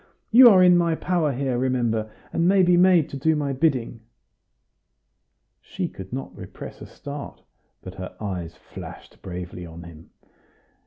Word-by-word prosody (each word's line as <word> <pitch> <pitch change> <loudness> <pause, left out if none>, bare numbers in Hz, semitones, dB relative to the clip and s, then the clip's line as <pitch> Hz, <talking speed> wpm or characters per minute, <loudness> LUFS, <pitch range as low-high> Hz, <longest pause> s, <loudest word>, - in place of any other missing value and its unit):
You 245 +2 +9
are 185 -4 +6
in 180 -1 +6
my 170 -1 +1
power 170 -3 0
here, 130 -1 -2
remember, 120 -4 0 0.2
and 170 - +1
may 190 0 +4
be 180 0 +4
made 175 -3 +4
to 140 - -5
do 160 +4 +1
my 145 -2 -2
bidding." 130 -5 0 1.6
She - - -4
could 95 -1 -11
not 135 +2 -6
repress - - -10
a - - -9
start, 145 0 -9 0.4
but 90 - -8
her 95 -1 -8
eyes 90 -5 -5
flashed - - -12
bravely 90 -1 -7
on 85 0 -10
him. 85 -1 -14
135 Hz, 155 wpm, -23 LUFS, -, 1.6 s, You